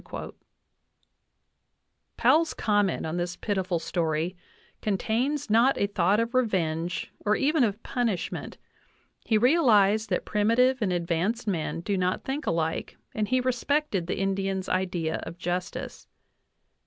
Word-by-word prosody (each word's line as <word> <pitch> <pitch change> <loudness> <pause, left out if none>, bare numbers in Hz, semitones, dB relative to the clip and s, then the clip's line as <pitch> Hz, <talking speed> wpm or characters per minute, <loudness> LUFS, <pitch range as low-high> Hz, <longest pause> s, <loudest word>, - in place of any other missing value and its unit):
Powell's 320 +1 +3
comment 205 -3 +1
on 160 +2 -3
this 175 0 -2
pitiful 190 -4 -1
story 165 +1 -1 0.5
con 205 -3 0
tains 265 +8 -1
not 230 +5 +4
a - - +3
thought 200 0 +2
of 230 +1 -1
revenge 175 -8 0
or 210 +1 +2
even 295 0 +2
of 210 -1 -1
punishment; 235 -8 -2 0.7
he 220 - +3
real 265 +5 +4
ized 210 +1 +4
that - - -1
primitive 235 +5 +2
and 200 -4 +1
advanced 175 +6 -1
men 165 -3 -2
do 195 +1 -1
not 180 0 0
think 275 +3 -4
alike 160 -1 -1 0.2
and 215 -1 -1
he 255 +3 +2
respected 255 - 0
the - - -2
Indians' 195 0 -1
idea 180 -3 -1
of 165 +1 -8
justice. 180 0 -4
200 Hz, 130 wpm, -27 LUFS, 175-235 Hz, 0.7 s, not